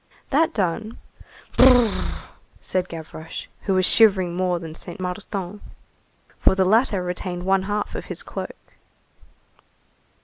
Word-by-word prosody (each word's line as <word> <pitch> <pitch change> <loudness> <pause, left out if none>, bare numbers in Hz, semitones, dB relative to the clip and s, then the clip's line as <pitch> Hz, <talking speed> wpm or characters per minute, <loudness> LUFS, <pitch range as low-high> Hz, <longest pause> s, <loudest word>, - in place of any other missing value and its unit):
That 310 +4 +3
done: 215 +3 -2 0.6
"Brrr!" 245 -4 +5 0.4
said 185 -1 -2
Gavroche, 160 -1 -7 0.2
who 195 - +2
was 185 0 +3
shivering 190 -6 +5
more 180 -1 +1
than 165 -2 -7
Saint 175 +2 -9
Martin, 190 +1 -5 0.8
for - - +4
the 190 -1 +3
latter 210 -1 +3
retained 180 0 -4
one 190 +1 +3
half 205 0 -2
of - - -5
his - - -6
cloak. - - -6
190 Hz, 125 wpm, -23 LUFS, 180-210 Hz, 0.8 s, Brrr